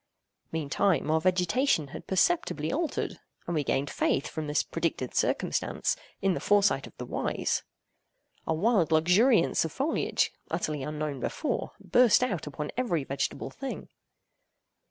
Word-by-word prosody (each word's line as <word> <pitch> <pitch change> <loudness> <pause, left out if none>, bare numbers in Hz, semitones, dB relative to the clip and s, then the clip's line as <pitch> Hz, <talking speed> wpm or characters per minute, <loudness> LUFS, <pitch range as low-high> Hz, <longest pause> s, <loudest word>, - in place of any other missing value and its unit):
Meantime, 160 +2 +1
our 160 0 +2
vegetation 180 - +2
had - - -9
perceptibly 190 - +1
altered; 320 +2 -2 0.3
and 175 - -3
we 150 -3 +1
gained 135 +1 0
faith, 135 - +1
from 155 -1 -5
this 150 +1 +1
predicted 165 -6 -2
circumstance, - - 0 0.3
in 195 -1 +3
the - - -2
foresight 205 -8 +3
of - - -17
the - - -5
wise. - - -1 0.9
A - - +2
wild 190 -2 +2
luxuriance 180 +6 +4
of 160 - -3
foliage, 290 - 0 0.2
utterly 155 -3 -2
unknown 150 -1 -3
before, 255 - -2
burst 235 +6 +4
out 195 -11 -2
upon 150 +1 -5
every 225 - 0
vegetable 140 +1 -3
thing. 270 -1 -6
170 Hz, 135 wpm, -28 LUFS, 150-220 Hz, 0.9 s, luxuriance